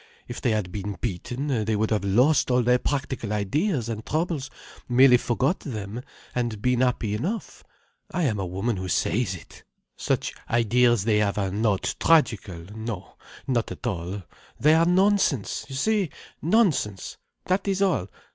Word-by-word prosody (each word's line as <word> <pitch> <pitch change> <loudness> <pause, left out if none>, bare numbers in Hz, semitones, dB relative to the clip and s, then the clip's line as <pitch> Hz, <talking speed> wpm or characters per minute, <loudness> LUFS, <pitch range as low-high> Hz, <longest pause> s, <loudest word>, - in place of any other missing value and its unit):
If 120 - -7
they 125 - +1
had 105 -5 -1
been 100 -1 -5
beaten, 120 - -2
they 110 0 0
would 110 +2 0
have 105 -2 +1
lost 125 +11 +3
all 125 -1 +3
their 125 +1 +3
practical 130 -6 -2
ideas 125 - 0
and 110 -2 -4
troubles, 155 -3 -2 0.4
merely 125 +1 +7
forgot 130 +8 0
them, 110 -3 -6 0.3
and 120 -4 -2
been 125 +2 +1
happy 120 -4 +1
enough. 180 - -4 0.5
I 180 - -1
am 110 -9 0
a 95 - -1
woman 95 +5 -2
who 95 0 -4
says 95 +3 0
it. 85 - -14 0.3
Such - - -1 0.2
ideas 120 -1 +3
they 105 -1 +2
have 105 -1 0
are 95 -2 0
not 105 -1 0
tragical. 105 - +2
No, 110 -5 -6 0.3
not 120 -3 0
at - - -8
all. 90 +2 -3 0.4
They 150 +3 +5
are 165 +1 +4
nonsense, 185 - +2
you 135 - -6
see, 205 +4 +1 0.3
nonsense. 160 - +1 0.3
That 185 +2 0
is 195 -1 +1
all. 180 - +1
120 Hz, 160 wpm, -25 LUFS, 105-145 Hz, 0.5 s, merely